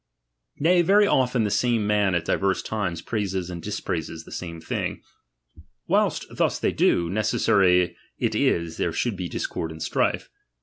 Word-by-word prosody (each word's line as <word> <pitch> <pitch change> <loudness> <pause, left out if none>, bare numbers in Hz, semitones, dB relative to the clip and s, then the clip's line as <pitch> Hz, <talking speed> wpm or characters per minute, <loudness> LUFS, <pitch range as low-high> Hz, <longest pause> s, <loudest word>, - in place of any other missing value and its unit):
Nay, 175 +4 +4
very 200 +4 +5
often 125 - +2
the 105 - -1
same 115 +1 +1
man 105 -3 +2
at 85 -1 -1
diverse 95 +2 0
times 90 -7 -3
praises 95 -5 -2
and 85 -1 -6
dispraises 80 -5 -4
the - - -9
Mine 85 -1 -7
thing. - - -4 0.8
Whilst - - +1
thus - - +1
they - - 0
do, 85 - +2
necessary 95 -2 +2 0.2
it - - 0
is 85 -1 0
there 85 - -1
should 120 +3 -1
be 90 -2 -4
discord 80 - -3
and 80 0 -6
strife. - - -1
95 Hz, 160 wpm, -24 LUFS, 85-110 Hz, 0.8 s, very